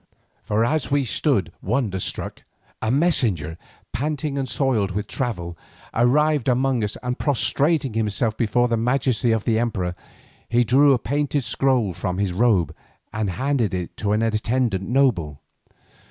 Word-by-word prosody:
For 110 +2 +1
as 150 +2 0
we 140 -1 +1
stood 110 - 0
wonder 105 -3 -1
struck, - - -4 0.4
a 110 - -1
messenger, 115 - +2 0.4
panting 145 +1 -2
and 135 -2 -2
soiled 110 -4 +1
with 105 +2 -3
travel, 90 -8 -3 0.4
arrived 140 +3 +2
among 130 -1 +1
us 105 - -3
and 125 0 -3
prostrating 145 0 +1
himself 110 0 0
before 120 +2 +2
the 115 -1 0
majesty 125 0 +1
of 110 -2 +1
the 110 -1 +1
emperor, 95 -7 -1 0.6
he 120 +1 +3
drew 135 +4 +5
a - - +3
painted 145 +5 -1
scroll 120 -5 +1
from 90 +1 -3
his 100 -2 -1
robe 100 -6 +2 0.4
and 110 -2 -1
handed 125 0 0
it 90 -2 -5
to 105 -1 -1
an 110 +2 +2
attendant 110 -2 0
noble. 115 - +1
120 Hz, 150 wpm, -23 LUFS, 105-135 Hz, 0.6 s, drew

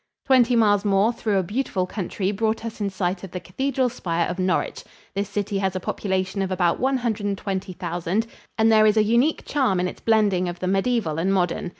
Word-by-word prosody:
Twenty 255 -2 +4
miles 205 -3 +4
more 205 +3 +3
through 215 -3 -1
a 190 - +2
beautiful 205 -1 -1
country 190 0 -3
brought 220 +2 -1
us 225 -1 -6
in 200 - 0
sight 185 -1 -2
of 195 - -7
the 180 - -5
cathedral 265 +8 -1
spire 170 -8 -1
of 180 - -4
Norwich. 185 0 -1 0.3
This 200 0 -2
city 205 -1 -2
has 190 -1 -1
a - - -1
population 190 +1 -2
of 190 - -1
about 180 -2 +1
one 265 +1 +2
hundred 225 -4 -2
and 200 -1 -1
twenty 190 -1 -4
thousand 175 +4 -2 0.3
and 225 0 +4
there 215 -1 +6
is 215 +1 +3
a 215 - +5
unique 235 +8 +2
charm 255 -11 +1
in 180 - +1
its - - -8
blending 205 -5 +2
of 175 - -6
the 185 - -3
mediaeval 195 -4 0
and 185 +4 +1
modern. 180 -2 0
200 Hz, 220 wpm, -23 LUFS, 185-225 Hz, 0.3 s, there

